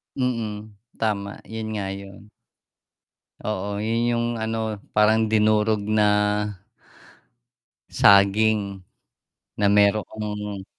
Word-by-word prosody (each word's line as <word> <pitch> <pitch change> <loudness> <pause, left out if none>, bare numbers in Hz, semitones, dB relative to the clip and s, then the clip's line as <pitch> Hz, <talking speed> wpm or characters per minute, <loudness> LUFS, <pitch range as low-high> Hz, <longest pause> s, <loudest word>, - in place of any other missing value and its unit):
Mm, 110 -5 -3 0.2
tama 100 -2 -2
'yun 110 0 -5
nga 105 -3 -3
'yun. 100 +1 -12 1.1
Oo, 100 -1 -3
'yun 110 +2 -1
'yung 120 0 0 0.2
ano 110 -1 -2 0.2
parang 110 +1 +3
dinurog 110 0 +3
na 105 -1 +3 1.8
saging, 100 0 +3 0.8
na 100 - +3
mayroong 105 0 0
105 Hz, 85 wpm, -23 LUFS, 100-110 Hz, 1.8 s, parang